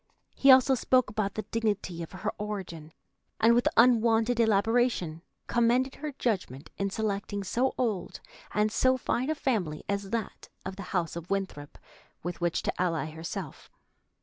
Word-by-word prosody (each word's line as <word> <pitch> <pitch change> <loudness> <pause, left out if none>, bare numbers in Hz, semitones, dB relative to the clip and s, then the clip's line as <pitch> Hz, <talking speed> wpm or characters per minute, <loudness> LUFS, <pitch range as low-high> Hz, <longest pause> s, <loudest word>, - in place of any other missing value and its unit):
He 275 - +3
also 260 +1 +7
spoke 255 -2 +2
about 205 -2 -2
the 215 - -3
dignity 205 -6 -2
of 165 - -7
her 190 +3 -3
origin, 190 -7 -5 0.5
and 225 +1 +5
with 240 +1 +3
unwonted 230 0 +4
elaboration 220 -6 +2 0.2
commended 240 +3 +2
her 305 0 -5
judgment 190 - -3
in 200 0 0
selecting 200 -1 -2
so 250 +7 0
old 215 -8 -2 0.3
and 210 0 +1
so 260 +3 +3
fine 255 +2 -1
a 315 - +1
family 195 - -1
as 200 -1 -2
that 225 -1 -4 0.2
of 190 0 -5
the 200 - -7 0.2
house 170 -2 -2
of 170 0 -7
Winthrop 190 -7 -3 0.5
with 175 +1 -5
which 170 -1 0
to - - -2
ally 165 -3 -1
herself. 160 0 -7
210 Hz, 155 wpm, -28 LUFS, 180-235 Hz, 0.5 s, also